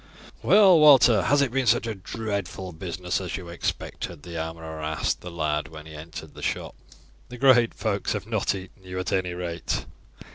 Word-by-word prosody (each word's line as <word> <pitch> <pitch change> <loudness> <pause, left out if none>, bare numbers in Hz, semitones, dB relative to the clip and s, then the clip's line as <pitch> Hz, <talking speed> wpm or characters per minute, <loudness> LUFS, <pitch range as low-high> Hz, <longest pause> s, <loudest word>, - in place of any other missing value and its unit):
"Well, 195 -5 +6
Walter, 135 -6 +7
has 145 0 +3
it 130 - -1
been 135 -1 0
such 115 +1 +3
a 115 - -2
dreadful 100 -2 -5
business 90 +2 -3
as 90 -3 -4
you 90 -3 -9
expected?" 85 -2 -4
the 85 -1 -8
armourer 80 -1 -5
asked 75 -2 -1
the 90 - -7
lad 75 -3 -1
when 75 +2 -11
he 80 - -11
re 75 - -9
entered 80 +1 -9
the - - -11
shop. - - -3 0.6
"The 125 - -8
great 120 -3 +5
folks 100 -3 -1
have 105 -3 -4
not 110 -3 0
eaten 95 0 -10
you 90 0 -7
at 90 +1 -2
any 90 -2 0
rate." 85 -1 -3
95 Hz, 190 wpm, -25 LUFS, 85-115 Hz, 0.6 s, Walter